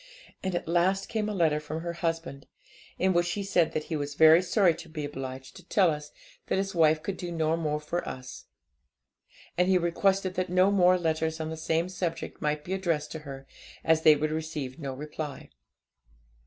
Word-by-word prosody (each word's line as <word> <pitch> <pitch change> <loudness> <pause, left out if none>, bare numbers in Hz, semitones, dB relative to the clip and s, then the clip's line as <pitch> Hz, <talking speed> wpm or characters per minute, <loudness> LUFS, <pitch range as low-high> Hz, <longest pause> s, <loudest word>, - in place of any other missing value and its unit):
And 190 -2 -2
at 175 - -3
last 185 +3 +1
came 215 -2 -1
a - - -2
letter 160 -4 +2
from 155 +1 -5
her 170 0 -4
husband, 165 -4 -3 0.5
in 190 0 +2
which 175 0 +1
he 205 - -3
said 180 -4 +2
that 155 - -1
he 160 - -4
was 145 -1 -3
very 160 +2 +7
sorry 185 -1 +3
to 165 +1 -11
be 155 -2 -4
obliged 130 -2 -7
to - - -13
tell 185 -5 +4
us 150 -1 -6 0.4
that - - 0
his 195 0 -1
wife 155 -2 +3
could 195 -2 -3
do 175 0 -5
no 160 -1 +1
more 150 -2 -1
for 170 +3 -3
us; 130 0 -9 1.1
and 180 - +4
he 190 -1 +4
requested 185 +2 +1
that 185 -1 -2
no 185 +2 +4
more 185 -2 +5
letters 160 -1 -1
on 160 0 -3
the - - -4
same 160 +2 0
subject 175 -3 -4
might 150 0 -1
be 185 - -4
addressed 165 -6 -1
to 160 - -5
her, 135 -2 -9 0.4
as 160 -1 +3
they 155 -1 +7
would 155 +1 -1
receive 155 -3 -4
no 140 -3 -4
reply. 150 0 -7
165 Hz, 200 wpm, -28 LUFS, 150-180 Hz, 1.1 s, very